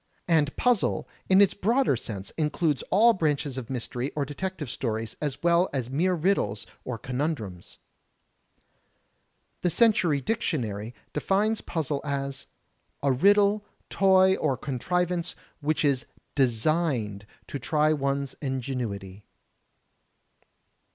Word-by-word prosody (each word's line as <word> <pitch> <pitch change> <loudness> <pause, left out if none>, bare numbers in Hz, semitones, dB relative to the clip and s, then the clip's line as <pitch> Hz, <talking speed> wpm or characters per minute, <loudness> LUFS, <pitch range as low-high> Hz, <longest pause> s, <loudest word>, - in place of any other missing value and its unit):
And 155 -4 +2
puzzle, 245 -5 +1 0.2
in 190 +1 +7
its 200 - +5
broader 235 - +2
sense 100 -4 -6
includes 150 -1 0
all 230 +4 +6
branches 150 - 0
of 130 -4 -6
mystery 125 +1 -3
or 145 -2 0
detective 160 +2 -4
stories 115 -3 -3
as 145 -1 -3
well 170 +1 +4
as 130 -3 -2
mere 180 +6 +2
riddles 155 - 0 0.2
or 125 -2 -4
conun 135 +8 -1
drums. 95 - -10 1.8
The 180 - +2
Century 175 -7 +3
Dictionary 125 - -2 0.2
defines 205 +8 +1
puzzle 150 -4 -2
as 140 -1 -3 0.6
"A 140 - +3
riddle, 200 +8 +4 0.3
toy 190 -1 +5
or 130 - 0
contrivance 175 +6 -1 0.2
which 155 +1 0
is 135 -4 +1 0.3
designed 120 - 0 0.2
to 140 - -5
try 155 +3 +2
one's 140 -1 -1
ingenuity." 120 -8 -4
145 Hz, 115 wpm, -27 LUFS, 125-180 Hz, 1.8 s, in